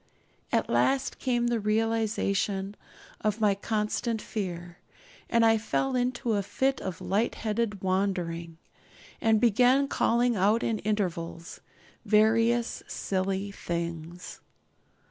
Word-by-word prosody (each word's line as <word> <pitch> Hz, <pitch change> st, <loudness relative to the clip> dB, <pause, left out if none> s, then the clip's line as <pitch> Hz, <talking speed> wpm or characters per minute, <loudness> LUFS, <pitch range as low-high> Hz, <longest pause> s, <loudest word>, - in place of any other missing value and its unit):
At -, -, +1 dB
last 270 Hz, 0 st, +1 dB
came 240 Hz, -2 st, 0 dB
the 240 Hz, -1 st, +1 dB
realisation 210 Hz, -2 st, 0 dB, 0.4 s
of 215 Hz, 0 st, -1 dB
my 210 Hz, -2 st, +4 dB
constant 215 Hz, +2 st, -1 dB
fear; 175 Hz, -5 st, -5 dB, 0.5 s
and 230 Hz, 0 st, +4 dB
I 225 Hz, 0 st, +4 dB
fell 265 Hz, +4 st, -1 dB
into 250 Hz, -2 st, 0 dB
a 205 Hz, -, +1 dB
fit 265 Hz, +7 st, -1 dB
of 185 Hz, -3 st, -5 dB
light 210 Hz, +5 st, 0 dB
headed 215 Hz, -2 st, -2 dB
wandering, 180 Hz, -3 st, -1 dB, 0.6 s
and 220 Hz, -1 st, +4 dB
began 250 Hz, +5 st, +4 dB
calling 240 Hz, -2 st, +2 dB
out 210 Hz, +4 st, +2 dB
at 225 Hz, -2 st, -1 dB
intervals 175 Hz, -5 st, -3 dB, 0.4 s
various 225 Hz, +2 st, +3 dB
silly 195 Hz, +1 st, -2 dB
things. 170 Hz, -1 st, -5 dB
210 Hz, 110 wpm, -28 LUFS, 190-230 Hz, 0.6 s, my